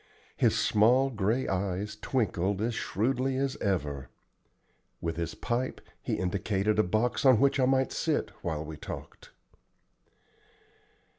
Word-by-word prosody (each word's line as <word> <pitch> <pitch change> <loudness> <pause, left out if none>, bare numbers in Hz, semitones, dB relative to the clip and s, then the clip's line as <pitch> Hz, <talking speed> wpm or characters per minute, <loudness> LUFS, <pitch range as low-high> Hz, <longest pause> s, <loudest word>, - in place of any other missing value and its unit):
His - - +3
small 125 +6 +4
gray 110 +3 0
eyes 95 +2 -2
twinkled 100 -5 -1
as 115 +3 0
shrewdly 130 +5 0
as 135 0 0
ever. 75 -9 -2 0.9
With 85 -1 -3
his 85 -2 -3
pipe 125 +1 -2 0.2
he - - -1
indicated 100 +3 0
a - - +6
box 110 +9 0
on 130 -5 +6
which 140 +1 +3
I 130 - +4
might 130 0 +2
sit - - -1
while 80 -2 -3
we 75 0 -7
talked. - - -9
105 Hz, 130 wpm, -29 LUFS, 90-130 Hz, 0.9 s, a